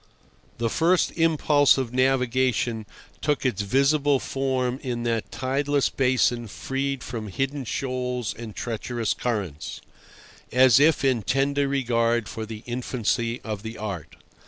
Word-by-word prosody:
The 115 - 0
first 170 +9 +2
impulse 155 -4 +4
of 125 -3 -2
navigation 125 -4 +1 0.3
took 150 -2 0
its 105 -6 +1
visible 140 +5 +3
form 130 -2 -1
in 120 -3 -3
that 115 -2 -1
tideless 140 +2 0
basin 125 -3 +1
freed 135 +4 -3
from 115 -2 -5
hidden 135 +6 -2
shoals 125 -2 -2
and 115 -2 -9
treacherous 115 0 -2
currents, 100 -11 -3 0.7
as 130 -1 +6
if 155 -1 +4
in 130 -4 +2
tender 140 +6 +1
regard 120 -4 +1
for 110 -1 -6
the 110 0 -8
infancy 120 -1 -1
of 105 -3 -4
the 110 +1 -7
art. 100 -7 -6
125 Hz, 130 wpm, -25 LUFS, 115-135 Hz, 0.7 s, as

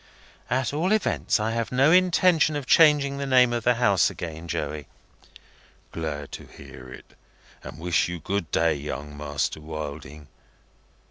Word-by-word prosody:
"At 130 +1 -1
all 175 +7 +1
events, 215 - 0
I 110 +1 -1
have 115 0 -3
no 135 +4 +4
intention 180 -3 +3
of 145 -2 -4
changing 145 -1 +4
the 140 - -3
name 125 -2 +4
of 120 -1 -2
the 125 +1 +3
House 100 -7 +3
again, 80 0 -7
Joey." 75 -3 -4 1.0
"Glad 75 -3 -5
to - - -9
hear 65 0 -13
it, - - -13 0.5
and - - -9
wish 85 +1 0
you 90 0 -5
good 95 +1 -3
day, 85 -1 +2
Young 75 0 -6
Master 75 +1 -3
Wilding. 75 -1 -8
95 Hz, 150 wpm, -25 LUFS, -, 1.0 s, no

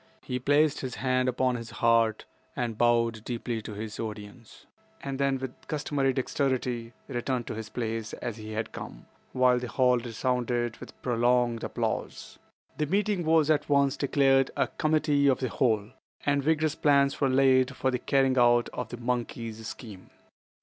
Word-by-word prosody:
He 125 - -3
placed 145 +3 +3
his 130 -3 -5
hand 130 -1 +1
upon 125 0 +1
his 115 -1 -8
heart 115 -2 +2 0.3
and 120 -2 -2
bowed 115 -1 +2
deeply 120 -1 -3
to 105 - -8
his 110 +1 -6
audience, 110 +1 -8 0.4
then, 135 0 0
with 130 -1 -5
customary 145 -3 0
dexterity, 125 -3 -1
returned 125 -1 -2
to - - -5
his 110 0 -6
place 115 -2 -4
as 120 -2 -5
he 110 0 -7
had 110 +1 -3
come, - - -9 0.3
while 125 -1 +3
the 125 - -5
hall 125 +2 +3
resounded 120 0 -1
with - - -12
prolonged 120 -1 +1
applause. - - -4 0.4
The 150 - +1
meeting 200 +1 0
was 160 -1 +3
at 150 -1 +1
once 140 -1 +3
declared 135 -1 +3
a - - +3
"Committee 155 -2 +1
of 135 - +3
the 130 - -1
Whole," 110 -4 0 0.3
and 145 0 +2
vigorous 155 +1 +1
plans 140 -1 +2
were 135 - +3
laid 130 0 +3
for 130 - 0
the 125 - -1
carrying 135 0 +2
out 120 0 +4
of 125 -3 -5
the 120 - -6
monkey's 115 -2 -4
scheme. 105 -6 -10
125 Hz, 165 wpm, -28 LUFS, 115-140 Hz, 0.4 s, out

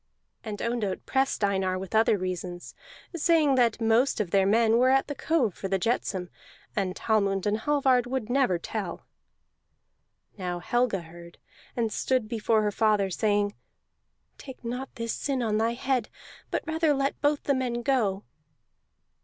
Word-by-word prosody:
And 210 -3 -5
Ondott 230 -5 -2
pressed 265 -4 0
Einar 190 -2 +1
with 190 +2 -7
other 220 -1 +4
reasons, 180 -1 -5 0.4
saying 320 -3 +3
that 240 -4 +2
most 230 +4 +2
of 195 -5 -2
their 195 -1 +3
men 225 +2 +4
were 255 +1 +4
at 270 0 +3
the 290 - -4
cove 280 - 0
for 195 - -5
the 195 0 +1
jetsam, 190 -3 -1 0.4
and 190 -3 -1
Hallmund 200 -3 +1
and 210 +1 +1
Hallvard 260 -2 +2
would 255 -3 -2
never 245 -7 +2
tell. 180 0 -5 1.3
Now 180 -1 -3
Helga 225 +2 0
heard, 170 +1 -13 0.4
and 225 -2 0
stood 255 -4 0
before 220 -1 +1
her 210 - +1
father, 210 -2 +2
saying: 205 +1 +1 0.9
"Take 265 -2 -11
not 250 +3 -4
this 230 -1 -3
sin 270 -3 -2
on 215 -2 0
thy 225 +1 +1
head, 250 -2 -1 0.4
but - - -2
rather 320 -2 +1
let 275 0 -1
both 290 0 +1
the 280 - +2
men 245 -2 -2
go." 215 -7 +1
225 Hz, 155 wpm, -27 LUFS, 195-260 Hz, 1.3 s, other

